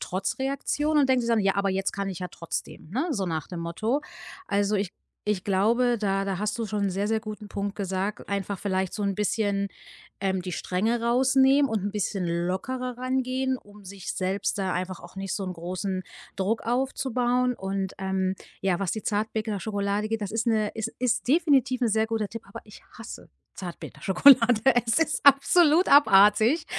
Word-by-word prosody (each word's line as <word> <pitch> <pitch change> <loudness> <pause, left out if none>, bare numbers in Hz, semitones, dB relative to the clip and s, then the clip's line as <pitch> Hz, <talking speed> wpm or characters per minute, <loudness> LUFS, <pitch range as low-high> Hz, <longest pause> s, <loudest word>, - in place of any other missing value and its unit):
Trotzreaktion 275 +9 -1
und 275 -2 +3
denkt 255 -2 +3
sich 235 - -3
dann: 225 -2 +3
„Ja, 195 0 +2
aber 200 0 +1
jetzt 195 +1 -1
kann 200 -1 -3
ich 190 -1 -6
ja 180 - -4
trotzdem“, 170 -1 -6
ne, 270 - -1
so 200 -9 -1
nach 160 -3 -3
dem 175 -2 -6
Motto. 215 - -1 0.5
Also, 205 +1 +1
ich 195 -2 -2 0.3
ich 210 -3 -1
glaube, 230 +5 +2
da 195 -2 0
da 195 -2 -2
hast 210 +3 -2
du 230 - -1
schon 210 -1 -2
'n 195 - 0
sehr, 195 +2 -1
sehr 220 0 +1
guten 215 -1 -8
Punkt 200 0 -4
gesagt, 195 +1 -3
einfach 200 -1 -2
vielleicht 190 -2 -1
so 210 - -3
'n 200 -1 0
bisschen, 200 -1 0 0.5
ähm, 190 -1 0
die 180 0 -5
Strenge 220 +8 -1
rausnehmen 265 +3 +4
und 220 -4 -1
'n 205 - -1
bisschen 200 -2 -2 0.2
lockerer 250 +6 -3
ran 255 +1 -1
gehen, 260 0 -1
um 205 0 -17
sich 190 -1 -6
selbst 190 +3 -1
da 190 -2 -1
einfach 185 0 -3
auch 175 +2 -14
nicht 195 -1 -3
so 195 - -3
'n 185 - -4
großen 185 +2 -4 0.3
Druck 205 +4 -1
aufzubauen. 250 0 0
Und, 195 -1 -3
ähm, 190 -1 -1 0.3
ja, 190 -3 +1
was 195 -3 -1
die 220 - -4
Zartbitterschokolade 210 -1 -2
geht, 225 -1 -2
das 205 - -4
ist 225 +2 -1
'ne 215 -2 +1
es 220 0 -3
ist 245 -1 0
definitiv 270 -5 +3
'n 235 - +3
sehr 220 +1 +2
guter 220 -2 -2
Tipp, 230 +2 -8
aber 200 - -9
ich 210 - -15 0.2
hasse - - -9 0.3
Zartbitterschokolade. 220 +6 +3 0.3
Es 230 +8 +2
ist 310 -3 0
absolut 305 +5 +5
abartig. 220 - +6
210 Hz, 190 wpm, -26 LUFS, 195-245 Hz, 0.5 s, abartig